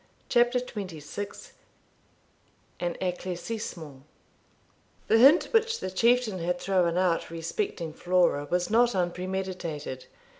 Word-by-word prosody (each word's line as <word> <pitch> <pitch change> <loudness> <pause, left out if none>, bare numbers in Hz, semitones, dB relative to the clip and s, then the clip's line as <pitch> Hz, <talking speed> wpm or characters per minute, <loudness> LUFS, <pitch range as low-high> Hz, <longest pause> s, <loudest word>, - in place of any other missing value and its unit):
CHAPTER 240 0 +3
XXVI 200 -4 -7 1.3
AN 175 -1 -2
ECLAIRCISSEMENT 180 -5 -5 1.0
The 225 - +4
hint 280 +8 +7
which 455 0 +2
the 185 - -4
Chieftain 230 0 +2
had 175 +1 -1
thrown 180 -3 +1
out 180 -2 +1
respecting 165 - -4
Flora 175 -4 +1
was 180 +2 0
not 240 0 +4
unpremeditated. 180 -6 -3
185 Hz, 100 wpm, -27 LUFS, 170-225 Hz, 1.3 s, hint